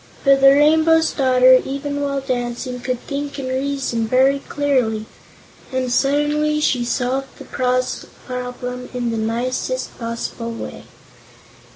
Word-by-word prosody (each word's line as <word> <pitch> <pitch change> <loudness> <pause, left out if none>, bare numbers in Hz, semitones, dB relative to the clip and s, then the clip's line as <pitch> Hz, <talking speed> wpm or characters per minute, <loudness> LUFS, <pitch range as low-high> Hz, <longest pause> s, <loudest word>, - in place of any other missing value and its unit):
But 275 -1 +5
the 275 - +9
Rainbow's 315 +3 +4
Daughter, 255 -1 +5
even 285 +1 -4
while 280 -1 -1
dancing, 250 -1 -3
could 250 0 -3
think 285 0 -5
and 265 -2 -4
reason 260 -3 -1
very 265 +4 +3
clearly, 250 -7 0 0.7
and 260 -1 -1
suddenly 295 +3 +1
she 255 -5 +1
solved 255 +2 -2
the - - -11
problem 250 0 -3
in 240 -1 -1
the 225 - -2
nicest 250 +3 -2
possible 230 0 -4
way. 230 - -8
255 Hz, 125 wpm, -20 LUFS, 250-280 Hz, 0.7 s, the